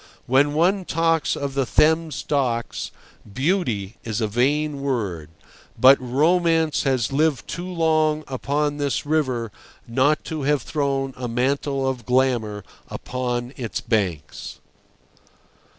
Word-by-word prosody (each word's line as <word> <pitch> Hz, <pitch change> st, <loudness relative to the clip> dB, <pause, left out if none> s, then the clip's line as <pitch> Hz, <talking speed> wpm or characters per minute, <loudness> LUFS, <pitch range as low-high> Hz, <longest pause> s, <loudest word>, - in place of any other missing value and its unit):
When 140 Hz, +3 st, +3 dB
one 185 Hz, +5 st, +2 dB
talks 165 Hz, -1 st, +1 dB
of 140 Hz, -1 st, -3 dB
the 135 Hz, 0 st, +1 dB
Thames 160 Hz, +3 st, +2 dB
docks, 125 Hz, -5 st, -1 dB, 0.4 s
"beauty" 120 Hz, -, -1 dB
is 110 Hz, -1 st, -3 dB
a 110 Hz, -, +1 dB
vain 140 Hz, +6 st, 0 dB
word, 100 Hz, -, -2 dB, 0.5 s
but 130 Hz, +1 st, +7 dB
romance 160 Hz, +4 st, +2 dB
has 130 Hz, -5 st, +1 dB
lived 150 Hz, -3 st, +1 dB
too 175 Hz, +2 st, -5 dB
long 155 Hz, -2 st, +2 dB
upon 145 Hz, +3 st, -1 dB
this 140 Hz, -3 st, -1 dB
river 130 Hz, -7 st, 0 dB, 0.4 s
not 130 Hz, +6 st, +2 dB
to 155 Hz, -2 st, -4 dB
have 140 Hz, -2 st, +1 dB
thrown 135 Hz, -3 st, -1 dB
a 125 Hz, -1 st, -4 dB
mantle 135 Hz, +3 st, 0 dB
of 125 Hz, -4 st, -3 dB
glamour 120 Hz, -5 st, +1 dB, 0.3 s
upon 125 Hz, 0 st, -3 dB
its 120 Hz, -5 st, -3 dB
banks. 90 Hz, -10 st, -2 dB
135 Hz, 120 wpm, -23 LUFS, 120-155 Hz, 0.5 s, but